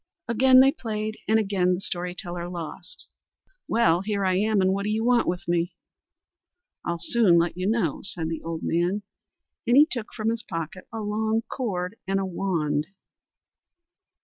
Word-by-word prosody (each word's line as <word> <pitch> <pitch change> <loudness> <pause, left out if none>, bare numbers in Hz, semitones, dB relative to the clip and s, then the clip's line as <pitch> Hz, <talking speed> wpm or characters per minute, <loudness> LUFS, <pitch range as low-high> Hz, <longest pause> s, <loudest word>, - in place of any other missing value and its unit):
Again 255 +3 +6
they 270 +1 +6
played, 215 -3 -4
and 220 - +4
again 195 -4 +2
the - - -5
story 180 -2 -4
teller 175 -1 -5
lost. 175 +1 -8 0.6
"Well! 175 -7 +3
Here 200 -1 -1
I 185 -1 +2
am, 215 +1 +2
and 190 0 +3
what 200 - -1
do 205 - -2
you 220 +2 0
want 245 -1 +3
with 175 0 -2
me?" 170 0 0 1.1
"I'll 170 - -2
soon 205 -3 +4
let 170 0 +1
you 185 +2 -1
know," 210 -10 0
said 175 -5 -3
the 165 0 -4
old 165 0 -5
man, 175 +5 0 0.6
and 240 +2 +5
he 295 - +9
took 245 -10 -5
from 220 -1 -1
his 230 0 -3
pocket 165 +1 -6
a 225 0 -4
long 220 +2 0
cord 200 -5 -3
and 195 0 +1
a 195 - -1
wand. 165 -5 -1
195 Hz, 175 wpm, -25 LUFS, 175-220 Hz, 1.1 s, he